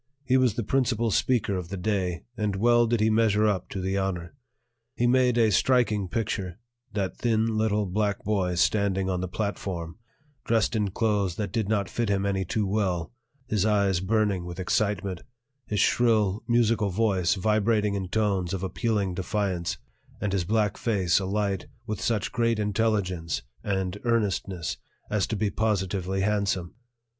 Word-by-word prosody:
He 130 - +2
was 130 -5 +3
the 120 - -1
principal 120 -2 +1
speaker 115 -2 +1
of 90 -2 -4
the 100 - -4
day, 90 -3 -1
and 105 -4 -1
well 120 +3 +4
did 115 -1 +1
he 110 +1 +3
measure 110 -1 +3
up 105 -3 0
to 100 - -4
the 95 +1 -1
honor. 90 -2 -3 0.6
He 120 - +1
made 125 0 +3
a 110 -2 +4
striking 110 -4 +2
picture, 95 -3 -3 0.4
that 100 -3 -2
thin 115 -1 +1
little 105 -1 +1
black 100 +1 -1
boy 95 -4 0
standing 95 0 +1
on 90 -1 -1
the 95 - -2
platform, 90 -2 -4 0.4
dressed 115 +1 +1
in 105 -2 +1
clothes 100 -3 0
that 100 -2 -3
did 105 -1 -1
not 100 -3 +1
fit 115 +1 -2
him 100 -1 +1
any 95 -1 0
too 105 +4 -1
well, 95 -3 -1 0.3
his 105 -5 0
eyes 100 -4 +2
burning 100 -1 +1
with 85 +1 -7
excitement, 95 -1 -1 0.5
his 105 - -1
shrill, 110 -4 +3
musical 115 -3 +2
voice 95 -2 +1
vibrating 105 +1 +1
in 95 -2 -2
tones 100 -3 0
of 95 - -5
appealing 100 0 -1
defiance, 95 -1 -2 0.4
and 100 -1 -2
his 95 -3 0
black 105 0 +1
face 95 -7 +2
alight 100 +4 -1 0.2
with 110 -2 -4
such 110 -4 0
great 115 -1 +1
intelligence 105 - 0 0.2
and 95 -1 -2
earnestness 100 -7 -1 0.3
as 105 -2 +1
to 110 - -2
be 105 -1 0
positively 95 -3 -1
handsome. 100 -3 0
100 Hz, 160 wpm, -26 LUFS, 95-110 Hz, 0.6 s, well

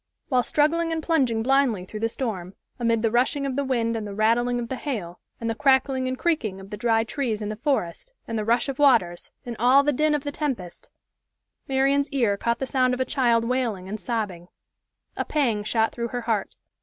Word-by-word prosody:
While 255 -3 +3
struggling 320 +6 +1
and 320 -1 -2
plunging 255 -9 +1
blindly 255 -7 +2
through 215 +3 -7
the 225 +1 0
storm, 195 -7 -4 0.2
amid 230 -1 +1
the 225 - +2
rushing 260 +4 +1
of 270 -2 -2
the 280 - 0
wind 235 -4 0
and 215 -2 -4
the 200 - -7
rattling 240 +3 +2
of 235 - -4
the 260 - -3
hail, 210 - -5 0.2
and 230 - -4
the 225 - 0
crackling 265 +1 +2
and 255 0 -2
creaking 240 - -1
of 195 +1 -12
the - - -3
dry 225 +1 +2
trees 230 -2 -2
in 210 -1 -4
the 215 - -3
forest, 265 - -2 0.2
and 230 - -4
the 215 - -1
rush 235 +4 +1
of 275 -1 -4
waters, 225 -12 +3 0.2
and 240 -1 -5
all 255 +4 +5
the 295 0 +1
din 300 +3 +2
of 290 - -3
the 290 - -3
tempest, 255 - -4 0.8
Marian's 275 +2 +2
ear 240 -8 +1
caught 235 +3 -1
the 265 - -3
sound 255 -1 +1
of - - -9
a 260 - +1
child 235 -4 +2
wailing 230 -7 -1
and 215 +3 -5
sobbing. 205 -8 -3 0.7
A - - -1
pang 240 -9 0
shot 220 +1 +1
through 235 -1 -3
her 245 +1 -4
heart. 225 -4 -2
240 Hz, 220 wpm, -24 LUFS, 220-270 Hz, 0.8 s, all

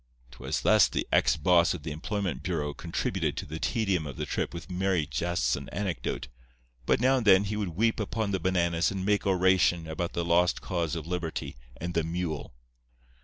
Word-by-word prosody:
"'Twas 60 - -3
thus - - +5
the - - -3
ex - - +3
boss 85 +2 +4
of 80 - -9
the 75 - -4
employment 90 - -3
bureau 75 -4 -2
contributed 85 +4 -2
to - - -3
the 80 +2 -6
tedium 95 - 0
of 70 - -8
the - - -2
trip - - -2
with 85 0 -8
merry 90 -3 0
jests 85 +5 0
and - - -8
anecdote. 95 -10 -3 0.6
But - - +3
now 130 +2 +4
and 115 -4 -2
then 95 0 +7
he 105 +1 -3
would 100 -6 -3
weep 115 +4 +2
upon 110 0 -2
the 95 - 0
bananas 85 -1 +1
and 95 -1 -3
make 100 -1 +1
oration 95 -2 +3
about 85 +2 -3
the 85 - -1
lost 85 +1 +3
cause 85 -3 -2
of 80 -3 -5
liberty 85 -2 -4 0.2
and 85 +1 -4
the 85 - +1
mule. 80 -5 -4
90 Hz, 195 wpm, -28 LUFS, 80-95 Hz, 0.6 s, then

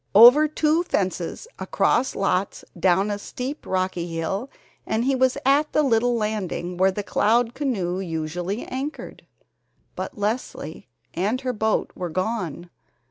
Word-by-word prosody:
Over 250 +8 +9
two 310 +2 +2
fences, 190 - -2
across 260 +2 +1
lots, 195 0 -1
down 190 +3 +3
a 205 - -3
steep, 260 +7 -6
rocky 185 -2 -1
hill, 175 +9 -3 0.3
and 220 +2 -1
he 270 - +2
was 260 -1 +2
at 285 +3 +3
the 305 - +4
little 245 -2 +2
landing 210 -5 -2
where 190 +1 +4
the 205 +2 -3
Cloud 230 +4 +2
canoe 195 -11 -1
usually 175 +3 -3
anchored. 275 +4 -6 0.7
But - - -5
Leslie 215 +5 -3 0.3
and 210 +9 0
her 255 -1 -2
boat 220 -1 0
were 180 -1 -4
gone. 185 -2 -3
210 Hz, 135 wpm, -24 LUFS, 185-255 Hz, 0.7 s, Over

